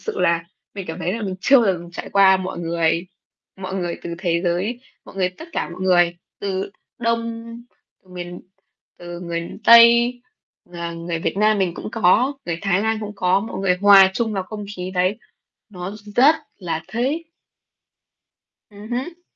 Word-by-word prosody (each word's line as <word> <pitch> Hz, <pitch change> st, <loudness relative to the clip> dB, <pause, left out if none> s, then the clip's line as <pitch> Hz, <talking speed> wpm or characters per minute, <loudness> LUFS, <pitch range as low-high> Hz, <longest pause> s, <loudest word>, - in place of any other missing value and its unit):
sự 445 Hz, -, -5 dB
là 170 Hz, 0 st, +2 dB, 0.3 s
mình 195 Hz, -3 st, -6 dB
cảm 160 Hz, -, -6 dB
thấy 180 Hz, -, -2 dB
là 225 Hz, +2 st, -4 dB
mình 190 Hz, -2 st, -3 dB
chưa 275 Hz, +7 st, +5 dB
bao 235 Hz, -4 st, +4 dB
giờ 175 Hz, -, -4 dB
mình 170 Hz, 0 st, -11 dB
trải 170 Hz, -, -7 dB
qua. 195 Hz, -1 st, +6 dB
Mọi 185 Hz, -1 st, -5 dB
người 170 Hz, 0 st, 0 dB, 0.5 s
mọi 190 Hz, 0 st, -6 dB
người 175 Hz, -3 st, -2 dB
từ 170 Hz, -, -5 dB
thế 170 Hz, -2 st, 0 dB
giới, 185 Hz, +8 st, -1 dB, 0.2 s
mọi -, -, -14 dB
người 185 Hz, -1 st, +1 dB
tất 320 Hz, -, -12 dB
cả -, -, -2 dB
mọi 175 Hz, +2 st, -10 dB
người 175 Hz, -2 st, +3 dB, 0.2 s
từ 195 Hz, -1 st, -3 dB, 0.3 s
Đông 230 Hz, -1 st, -2 dB, 0.7 s
miền 175 Hz, -1 st, -7 dB, 0.6 s
từ 175 Hz, 0 st, -8 dB
người 170 Hz, -1 st, -3 dB, 0.2 s
Tây, 235 Hz, +1 st, +7 dB, 0.6 s
à, 170 Hz, -1 st, -5 dB
người 170 Hz, 0 st, -4 dB
Việt 165 Hz, -, -2 dB
Nam 215 Hz, +1 st, +3 dB
mình 185 Hz, -3 st, 0 dB
cũng -, -, -6 dB
có, 230 Hz, +7 st, +3 dB
người 170 Hz, -1 st, -2 dB
Thái 195 Hz, -1 st, +1 dB
Lan 220 Hz, 0 st, 0 dB
cũng 210 Hz, -1 st, -6 dB
có, 185 Hz, 0 st, +2 dB
mọi 225 Hz, -, -6 dB
người 185 Hz, -2 st, +2 dB
hòa 200 Hz, -2 st, +8 dB
chung 225 Hz, 0 st, -1 dB
vào 195 Hz, -2 st, -2 dB
không 210 Hz, +2 st, -7 dB
khí 180 Hz, 0 st, -5 dB
đấy, 185 Hz, +4 st, +1 dB, 0.5 s
nó 180 Hz, -2 st, -6 dB
r -, -, -9 dB, 0.2 s
rất 280 Hz, +6 st, +7 dB, 0.2 s
là 165 Hz, -4 st, -3 dB
thích. 265 Hz, +8 st, -1 dB, 1.5 s
Ừm 205 Hz, +1 st, -12 dB
hứm. 275 Hz, +9 st, -4 dB
190 Hz, 185 wpm, -21 LUFS, 175-220 Hz, 1.5 s, hòa